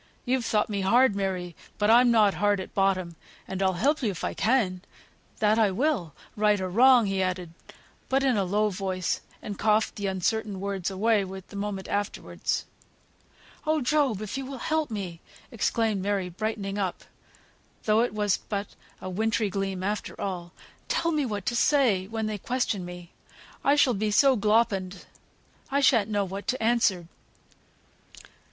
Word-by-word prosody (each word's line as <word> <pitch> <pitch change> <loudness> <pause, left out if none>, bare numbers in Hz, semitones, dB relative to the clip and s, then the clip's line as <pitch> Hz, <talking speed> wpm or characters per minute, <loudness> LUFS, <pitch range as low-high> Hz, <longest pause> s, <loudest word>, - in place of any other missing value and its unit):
You've 250 -1 0
thought 210 -2 +1
me 200 -2 -2
hard, 235 +3 +4
Mary, 185 -3 -3 0.2
but 210 +1 +3
I'm 245 +1 +6
not 215 -4 +4
hard 205 -1 +1
at 190 - -7
bottom, 185 -3 +1 0.3
and 190 0 -4
I'll 190 -1 +2
help 285 - +1
you 230 - +1
if 185 - -6
I - - -1
can; 215 -6 +1 0.6
that 215 +1 +3
I 215 -2 +4
will, 195 - -1 0.2
right 210 -1 +3
or 185 -1 -2
wrong," 245 +2 +6
he 195 -1 0
added; 180 -2 -2 0.6
but 270 +1 +2
in 265 -3 +3
a 200 - +1
low 210 +3 +1
voice, 185 -1 -2 0.2
and 205 -2 -6
coughed 215 +1 +2
the 200 -1 -2
uncertain 195 +2 -1
words 195 -2 -2
away 205 +2 +2
the 190 +1 -9
moment 200 -1 -4
afterwards. 205 0 -2 1.0
"Oh, 310 0 +2
Job! 265 -6 +1
if 215 +6 -4
you 270 - -5
will 270 0 -6
help 310 +4 -1
me," 190 -6 -5 0.3
exclaimed 225 -2 0
Mary, 195 -2 -1
brightening 205 +1 -3
up 190 -3 -2 0.8
(though 215 0 +3
it 245 - 0
was 205 -2 +1
but 200 -1 -4 0.3
a - - -6
wintry 215 +2 0
gleam 195 -1 -3
after 210 +2 -3
all), 175 -3 -4 0.4
"tell 335 - 0
me 300 -4 0
what 205 -4 -4
to 240 - -1
say, 235 -8 +3
when 220 +1 -3
they 215 -1 -3
question 240 -4 -1
me; 175 -1 -9 0.5
I 280 - +4
shall 280 -4 +4
be 215 0 -1
so 265 +5 +5
gloppened, 205 -4 +1 0.6
I 275 +1 +1
shan't 230 -7 +4
know 205 -2 0
what 195 +2 -7
to 255 -3 -1
answer." 220 -7 +2
205 Hz, 170 wpm, -27 LUFS, 190-230 Hz, 1.0 s, I'm